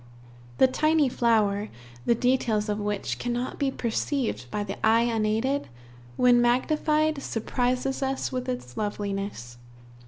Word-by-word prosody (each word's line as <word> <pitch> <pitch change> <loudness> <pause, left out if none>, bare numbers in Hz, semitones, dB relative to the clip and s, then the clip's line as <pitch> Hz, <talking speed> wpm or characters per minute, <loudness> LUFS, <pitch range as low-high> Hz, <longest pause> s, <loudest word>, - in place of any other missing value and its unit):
The - - +6
tiny 305 +2 +2
flower, 215 -4 +1 0.4
the 235 - +4
details 230 -3 +1
of 210 0 -1
which 205 -1 -2
cannot 245 +1 -3
be 280 -2 +1
perceived 235 - -2
by 210 - -2
the 200 +1 -7
eye 225 +1 +5
unaided, 230 +4 0 0.5
when 245 -1 +5
magnified, 305 +4 +2
surprises 250 +3 -1
us 270 0 -1
with 255 0 -3
its 245 - -5
loveliness. 200 - -4
240 Hz, 125 wpm, -26 LUFS, 210-265 Hz, 0.5 s, The